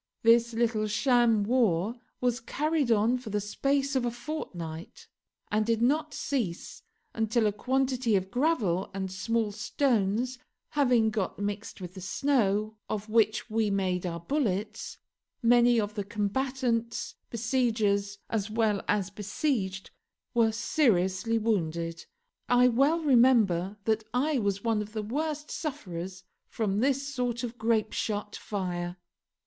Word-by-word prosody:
This 230 0 +5
little 225 -2 +1
sham 235 -1 +3
war 215 -4 +2 0.3
was 245 -1 +1
carried 295 +2 0
on 225 +3 +3
for 245 - -8
the 210 0 0
space 275 +7 0
of 260 - +2
a 240 - +1
fortnight, 180 - -7 0.4
and 215 +1 +2
did 230 0 +1
not 300 +6 +2
cease 230 - -3 0.3
until 225 0 +1
a 210 - +3
quantity 255 +1 0
of 190 0 -1
gravel 230 - +1
and 190 -1 -3
small 220 +3 -1
stones 235 +1 0 0.3
having 245 -6 +3
got 210 -3 -2
mixed 205 +1 -4
with 180 -1 -7
the 190 - -9
snow 215 -1 +1
of 215 0 -3
which 220 -1 +2
we 220 -1 +1
made 185 -2 0
our 170 -1 -4
bullets, 215 - -2 0.5
many 240 0 +5
of 210 -1 -2
the 205 -2 -3
combatants, 230 +3 -1 0.2
besiegers 220 -4 0
as 215 -2 -2
well 215 -2 +1
as 200 -2 0
besieged, 200 -1 -2 0.4
were 230 -2 +4
seriously 225 - +1
wounded. 170 -6 -1 0.4
I 245 0 +6
well 280 +7 +3
remember 230 - +4
that 220 0 +1
I 280 +2 +2
was 200 -2 -1
one 225 -2 +1
of 210 0 -8
the 215 -1 -3
worst 300 +6 -3
sufferers 185 - -5 0.2
from 205 -3 -1
this 275 +2 +1
sort 250 -3 -2
of 240 -1 -5
grapeshot 215 -2 -1
fire. 180 -3 -4
225 Hz, 135 wpm, -28 LUFS, 200-245 Hz, 0.5 s, I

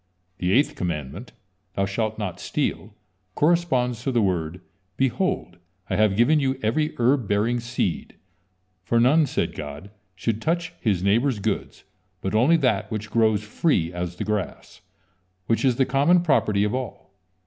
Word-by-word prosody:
The 90 0 0
eighth 135 +8 +3
commandment: 85 - -4 0.4
"Thou 100 - +1
shalt 110 +2 -2
not 105 -5 -4
steal," - - -3 0.4
corresponds 145 -8 +1
to 135 - -1
the 120 - +2
word: 90 -2 -1 0.4
"Behold, 130 - -1 0.3
I - - +1
have 105 -1 +3
given 130 +8 +4
you 135 -1 0
every 150 +8 0
herb 125 -1 +2
bearing 110 +4 +1
seed," 120 -7 -3 0.7
for 115 +5 +1
none, 145 +6 +4
said - - -1
God, 75 +6 -8 0.2
should 110 +4 -2
touch 170 +1 -1
his 100 -7 +1
neighbor's 115 +6 +2
goods, 105 0 -3 0.4
but 95 - -3
only 130 +10 +4
that 110 -9 +1
which 105 -1 -5
grows 110 -2 +2
free 105 - 0
as 90 0 -4
the 95 - -4
grass, 105 -2 -4 0.6
which 115 +6 0
is 130 -3 +3
the 130 - +2
common 145 +7 +3
property 105 -10 +2
of 105 - 0
all. 130 -6 -5
110 Hz, 155 wpm, -24 LUFS, 100-135 Hz, 0.7 s, given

